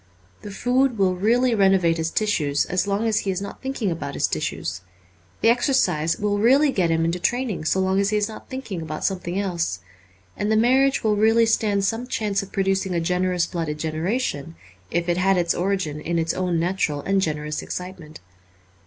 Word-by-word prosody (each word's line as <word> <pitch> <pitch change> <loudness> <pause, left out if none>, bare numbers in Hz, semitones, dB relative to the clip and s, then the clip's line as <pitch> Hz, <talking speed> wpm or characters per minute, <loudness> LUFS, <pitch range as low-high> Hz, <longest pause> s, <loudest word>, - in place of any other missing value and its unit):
The 205 - -8
food 250 +4 +1
will 190 -2 +2
really 235 +6 +2
renovate 190 -5 +3
his 160 0 -1
tissues 155 -9 0
as 185 +2 -1
long 200 +3 0
as 220 -2 +2
he 195 - -3
is 185 -1 -1
not 200 0 -8
thinking 265 -7 -2
about 145 -4 -5
his - - +1
tissues. 85 +3 -3 0.6
The 225 - +5
exercise 235 - +2
will 205 0 0
really 270 +6 +4
get 180 -8 +1
him 165 0 +1
into 170 +2 -1
train 245 +6 0
ing 165 -5 -5
so 190 - +1
long 190 +1 +1
as 200 0 +2
he 215 - +1
is 210 +1 -1 0.2
thinking 260 - -5
about 155 -1 -5
something 180 -2 -2
else. 170 - -2 0.6
And 205 +1 -1
the 220 - +3
marriage 265 +4 +3
will 215 -1 +2
really 225 +2 +4
stand 210 -3 +1
some 230 +4 -2
chance 210 -5 -1
of 195 - -10
producing 195 -1 0
a - - +2
generous 180 +1 0
blooded 160 -3 -3
generation 160 - -2 0.3
if 170 - -1
it 175 0 +1
had 190 +1 +3
its 170 -1 +1
origin 180 -5 -2
in 170 +2 -2
its 165 0 0
own 180 -2 -1
natural 165 -4 -1
and 195 +5 +1
generous 150 -3 -2
excitement. 180 - -7
190 Hz, 195 wpm, -23 LUFS, 165-215 Hz, 0.6 s, The